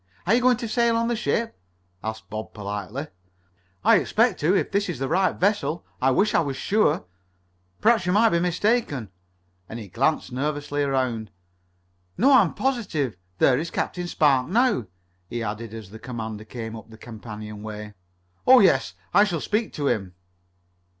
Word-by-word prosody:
Are 195 - +3
you 245 - +4
going 250 -1 +4
to 235 - -4
sail 235 +1 +2
on 230 0 0
the 240 - +1
ship?" 230 0 -1 0.5
asked 110 0 -5
Bob 110 +1 -7
politely. 105 +6 -5 0.8
"I - - +6
expect - - +2
to, 170 +6 +2
if - - -1
this 200 -1 0
is 170 - -3
the 135 +1 -2
right 185 +5 +2
vessel. 200 -4 0 0.2
I 130 - +4
wish 200 +11 +2
I - - +4
was 140 -4 -2
sure. 205 -7 +1 0.8
Perhaps 220 -5 +3
you - - +2
might 220 +4 +5
be 170 - +2
mistaken," 175 - 0 0.6
and 110 - -6
he 110 -3 -8
glanced 135 - 0
nervously 145 +2 -2
around. 130 -6 -1 0.9
"No, 265 +7 +4
I 260 - +8
am - - -1
positive. 205 - -1 0.2
There 125 +4 +4
is 165 +2 -3
Captain 175 +1 -3
Spark 140 -6 +3
now," 215 - +2 0.4
he 120 -1 -3
added 110 +1 -5
as 110 -4 -9
the 110 - -10
commander 110 -3 -6
came 110 0 -6
up 110 0 -11
a 110 - -12
companionway. 105 -1 -8 0.5
"Oh, 260 0 +9
yes. 195 - +3 0.2
I 205 - +7
shall 175 -6 -1
speak 215 +7 -1
to 145 -2 -2
him." 95 -7 -1
145 Hz, 170 wpm, -24 LUFS, -, 0.9 s, Oh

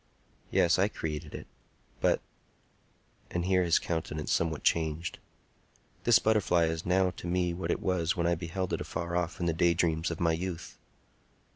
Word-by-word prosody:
Yes; 85 +1 +3
I 100 - +4
created 75 -7 -5
it. - - -7 0.5
But"—and 85 0 -5
here 95 0 +3
his 85 -2 +4
countenance 80 -2 -3
somewhat 80 -2 0
changed—"this 85 +7 -1
butterfly 95 -6 +3
is 80 +1 -3
not - - -2
now 90 - +2
to 85 - -8
me 90 0 +1
what 90 +2 -4
it - - -1
was 90 -1 +1
when 85 -2 0
I 85 - +3
beheld 85 +3 -3
it - - -1
afar 85 +1 -4
off 90 -1 -1
in 90 - -1
the 85 - +2
daydreams 85 0 +2
of 85 - -4
my 85 -1 +2
youth." 85 0 -5
85 Hz, 160 wpm, -30 LUFS, 80-90 Hz, 0.5 s, I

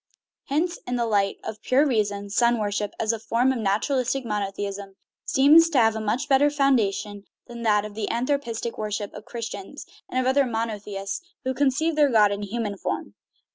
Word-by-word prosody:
Hence 335 +5 -1
in 245 - -1
the 240 -1 0
light 200 -3 +1
of 220 - -6
pure 270 +4 +3
reason, 205 -6 -1
sun 235 +3 +3
worship, 205 -1 -2
as 225 0 +1
a 225 - -4
form 235 +4 +1
of 260 - -2
nat 200 -1 +1
uralistic 265 -1 0
monotheism, 200 -2 -4 0.3
seems 305 +5 +6
to 300 - 0
have 225 -2 +4
a 220 - -3
much 225 +7 -1
better 285 +1 +4
foundation 215 -8 0 0.2
than 235 -1 -9
the 210 -1 0
anthropistic 235 -2 -2
worship 210 -1 -3
of 210 - -10
Christians 235 - -7 0.2
and 255 - -1
of 255 - 0
other 265 +1 +3
monotheists 210 - -4 0.2
who 260 0 -1
conceive 285 +4 +1
their 295 -2 +4
god 215 -4 +4
in 200 0 -3
human 205 -1 -4
form. - - -4
230 Hz, 175 wpm, -24 LUFS, 205-265 Hz, 0.3 s, seems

